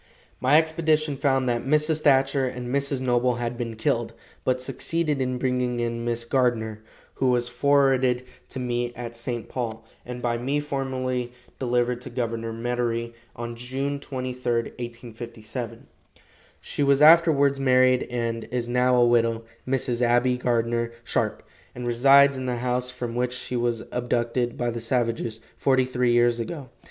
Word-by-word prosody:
My 135 +4 +5
expedition 160 -2 +1
found 135 -1 +1
that 120 -1 0
Mrs. 150 +3 +2
Thatcher 135 -1 +3
and 125 0 -5
Mrs. 140 -1 0
Noble 125 -1 +2
had 120 0 -3
been 115 -2 -4
killed, 115 +1 -1 0.3
but 130 0 +1
succeeded 150 +2 -1
in 130 -1 -1
bringing 125 -1 0
in 115 0 -2
Miss 120 0 -2
Gardner, 115 -4 0 0.3
who 130 - 0
was 120 -1 +2
forwarded 130 -1 +3 0.3
to - - -8
me 120 -1 -2
at 120 -1 -7
St. 120 0 -4
Paul, 115 -3 -4 0.2
and 125 0 -7
by 120 -1 -1
me 135 +4 0
formally 130 -3 -3 0.3
delivered 125 -1 0
to - - -7
Governor 115 -2 -3
Medary 115 0 -2 0.2
on 120 0 -5
June 135 +4 -3
23, 125 -3 -4
1857. 115 -1 -6 0.7
She - - -4
was 140 +1 +4
afterwards 150 -4 +6
married, 130 -1 +4
and 115 -2 -2
is 120 0 -3
now 125 +1 +3
a 120 -1 +5
widow, 115 -1 +2 0.2
Mrs. 125 -2 -1
Abbie 120 +1 +3
Gardner 115 -1 0
Sharpe, - - -1 0.3
and 125 - -5
resides 135 +3 +5
in 130 0 -4
the 125 - 0
house 125 +1 -1
from 125 -2 -5
which 125 +1 -1
she 125 0 -4
was 120 -2 0
abducted 120 0 -1
by 120 -1 -1
the 115 0 -5
savages, 115 -1 -1 0.2
forty 130 -1 +3
three 125 -1 +1
years 120 0 +3
ago. 135 +2 -5
125 Hz, 155 wpm, -25 LUFS, 120-130 Hz, 0.7 s, afterwards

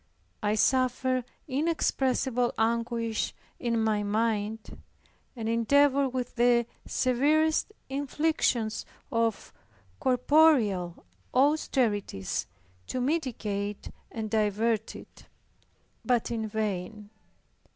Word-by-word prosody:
I 210 -1 +1
suffered 255 +1 +2 0.2
inexpressible 265 -4 0
anguish 230 0 0 0.2
in 235 -2 0
my 215 -1 +1
mind, 215 +1 -2 0.5
and 225 -2 -4
endeavored 275 +4 +3
with 250 0 -4
the 240 0 +4 0.2
severest 305 +8 +2 0.2
inflictions 270 -5 0 0.3
of 230 -2 -1 0.5
corporeal 250 - +3 0.3
austerities 240 - +1 0.4
to 255 - -3
mitigate 225 -8 -2 0.2
and 220 -1 -4
divert 220 +1 0
it - - -13 0.8
but 245 -2 +1
in 220 -2 -2
vain. 210 -1 -4
235 Hz, 80 wpm, -28 LUFS, 215-260 Hz, 0.8 s, the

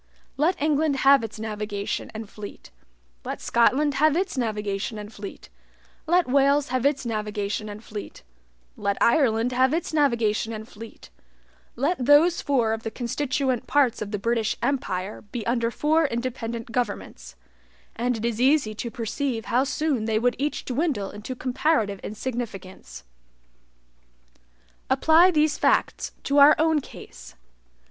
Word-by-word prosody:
Let 320 +6 +1
England 300 0 +1
have 275 -3 +6
its 220 -1 -7
navigation 210 -2 -4
and 220 0 -6
fleet 205 0 -10 0.5
let - - -5
Scotland 275 +5 +2
have 305 +3 +3
its 370 -2 -1
navigation 210 -3 -2
and 210 +1 -8
fleet 200 -2 -9 0.6
let 350 0 +3
Wales 280 +2 +3
have 255 +1 +2
its 280 -2 -1
navigation 210 -1 -3
and 205 +2 -9
fleet 210 -2 -8 0.5
let 200 -1 -1
Ireland 235 -2 +3
have 260 +4 +2
its 335 -1 -3
navigation 235 -6 +1
and 220 0 -7
fleet 225 0 -12 0.6
let 275 +3 0
those 305 +6 +5
four 245 -6 +1
of 225 - -4
the 225 - -4
constituent 255 +1 -2
parts 270 -3 +2
of 210 - -4
the 210 - -2
British 225 +1 0
empire 210 -7 -2
be 220 +2 -7
under 235 -1 +1
four 310 +5 +2
independent 235 -2 -4
governments, 65 - -4 0.6
and 245 +1 -1
it 220 - -4
is 235 0 -1
easy 265 -4 +3
to 235 +3 -5
perceive 230 +1 -3
how 250 +2 +4
soon 280 -4 -1
they 220 -1 +1
would 245 +2 +1
each 295 +2 -2
dwindle 255 - -1
into 210 +5 -7
comparative 250 -5 0
insignificance. 215 - -6 1.9
Apply 325 +3 +5
these 305 -3 +2
facts - - +1
to 280 +1 +2
our 285 +2 +8
own 315 -1 +2
case. - - -12
240 Hz, 140 wpm, -25 LUFS, 215-285 Hz, 1.9 s, our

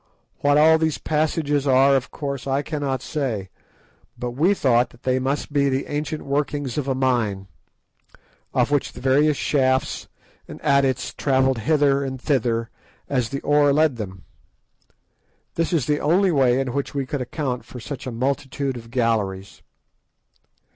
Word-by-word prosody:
What 145 0 +3
all 160 +1 +6
these 160 -2 0
passages 150 -2 0
are, 135 +1 +5
of 135 0 -1
course 140 -2 -5
I 135 +1 0
cannot 140 -5 -3
say, 115 -11 -3 0.7
but 125 0 -4
we 165 +11 +2
thought 120 -6 +2
that 120 - -21
they 130 0 +1
must 140 +3 -2
be 140 -1 +3
the 135 +1 -1
ancient 150 +1 -4
workings 140 -1 -2
of 145 -2 -2
a 135 - 0
mine, 120 -7 0 1.1
of - - +1
which 145 -2 0
the - - -10
various 140 +3 +3
shafts 130 -2 0 0.4
and - - -9
adits 135 -2 +1
travelled 130 -2 +2
hither 140 +1 +2
and 130 -1 -4
thither 120 -4 0 0.4
as 125 -5 0
the 140 0 -4
ore 145 0 +3
led 150 -3 +2
them. 95 -4 -7 1.3
This 165 +1 -1
is 160 -8 +1
the 150 +2 +1
only 180 +5 +3
way 130 -4 +3
in 130 -2 -2
which 140 +1 -3
we 140 -1 -1
could 135 +1 -3
account 125 -1 -3
for 125 - -10
such 135 +2 -7
a - - -3
multitude 135 +2 -2
of 115 -1 -11
galleries. 105 -5 -1
135 Hz, 160 wpm, -22 LUFS, 125-145 Hz, 1.3 s, all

